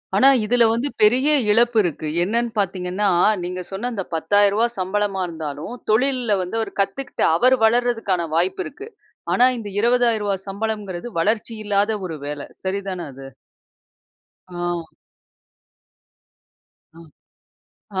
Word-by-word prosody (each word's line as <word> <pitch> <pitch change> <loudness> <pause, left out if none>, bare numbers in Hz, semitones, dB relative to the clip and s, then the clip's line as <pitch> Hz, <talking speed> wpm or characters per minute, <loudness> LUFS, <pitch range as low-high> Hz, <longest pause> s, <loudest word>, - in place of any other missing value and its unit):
ஆனா, 260 +7 +6 0.2
இதில 240 +2 +4
வந்து 235 +5 -1
பெரிய 250 +7 +4 0.2
இழப்பு 235 +1 +3
இருக்கு. 155 -3 -3 0.2
என்னன்னு 235 +4 0
பார்த்தீங்கன்னா, 190 +1 -1 0.4
நீங்க 180 +1 -4
சொன்ன 205 +6 -3
அந்த 200 -4 -3
₹10,000 205 +7 +3
சம்பளமா 195 +1 -1
இருந்தாலும், 160 +2 -6 0.2
தொழில்ல 245 -1 +2
வந்து 225 +5 -2 0.2
கத்துக்கிட்டு, 260 +6 -2
அவரு 255 +8 +4
வளர்றதுக்கான 225 -7 +1
வாய்ப்பு 185 +2 +1
இருக்கு. 410 +10 -9 0.4
ஆனா, 250 - +5
இந்த 210 -3 -6
₹20,000 230 -3 +2
சம்பளம்ங்கிறது 205 0 -4
வளர்ச்சி 215 +5 0
இல்லாத 205 +1 +1
ஒரு 160 -4 -5
வேலை. 145 0 -5 0.2
சரிதானே. 190 -2 -3
அது? 135 +1 -10 1.2
ஆ. 175 -2 -4 2.0
அ, - - -18 1.0
ஆ, - - +3
205 Hz, 115 wpm, -21 LUFS, 180-235 Hz, 2.0 s, ஆனா